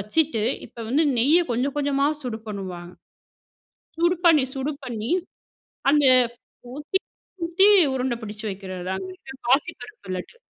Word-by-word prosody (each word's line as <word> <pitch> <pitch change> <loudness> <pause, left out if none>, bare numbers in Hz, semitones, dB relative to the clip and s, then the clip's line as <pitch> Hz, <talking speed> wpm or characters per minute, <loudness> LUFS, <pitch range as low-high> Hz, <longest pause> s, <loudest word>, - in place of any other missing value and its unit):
வச்சுட்டு 225 +2 0 0.2
இப்போ 235 0 -13
வந்து 290 +6 +3 0.2
நெய்யை 310 +9 +5
கொஞ்சம் 260 +4 -1
கொஞ்சமா 280 0 +1 0.2
சூடு 240 -3 -4
பண்ணுவாங்க. 185 -4 -6 1.1
சூடு 345 +1 +3
பண்ணி, 310 -5 +6
சூடு 270 +3 -2
பண்ணி, 230 -2 -4 0.8
அந்த 295 0 +4 0.7
ஊத்தி, 300 +6 -2 0.5
ஊத்தி 345 +4 +4 0.3
உருண்டை 255 -2 -1
பிடிச்சு 215 +1 -7
வைக்கிறதுதாங்க, 190 -1 -5
இந்த 265 - -11 0.2
பாசிப்பருப்பு 250 - -1
லட்டு. 180 - -8
250 Hz, 120 wpm, -24 LUFS, 205-295 Hz, 1.1 s, பண்ணி